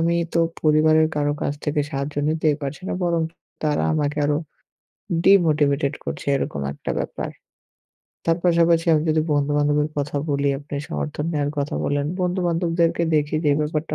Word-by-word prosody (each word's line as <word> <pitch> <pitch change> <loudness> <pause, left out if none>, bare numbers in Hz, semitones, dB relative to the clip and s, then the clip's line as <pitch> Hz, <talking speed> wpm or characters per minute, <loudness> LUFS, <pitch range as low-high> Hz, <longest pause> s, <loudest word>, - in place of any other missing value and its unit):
আমি 170 +1 +2 0.2
তো 170 - +4 0.2
পরিবারের 155 +1 +4
কারো 145 0 +1
কাছ - - 0
থেকে 150 0 0
সাহায্য 140 0 -3
নিতেই 155 -2 +1
পারছি 140 +5 -5
না - - -1
বরং 170 -2 +1 0.4
তারা 150 -1 +1
আমাকে 150 0 -1
আরো 145 0 +1 0.9
ডিমোটিভেটেড 150 -6 +4
করছে - - -5
এরকম 70 - -3
একটা 70 - -6
ব্যাপার। - - -4 1.0
তার 165 0 +3
পাশাপাশি 170 -1 +3
আমি 155 -1 +3
যদি 155 0 +2
বন্ধু-বান্ধবের 145 +1 +2
কথা 145 0 -2
বলি 140 0 +1
আপনি 145 +1 -9
সমর্থন 75 - -3
নেওয়ার 145 -2 0
কথা 140 +1 -2
বলেন, 145 0 0
বন্ধু-বান্ধবদেরকে 170 -2 +1
দেখি 150 0 +1
যে - - +3
এই 145 - +1
ব্যাপারটা 150 0 -2
150 Hz, 155 wpm, -22 LUFS, 145-165 Hz, 1.0 s, তো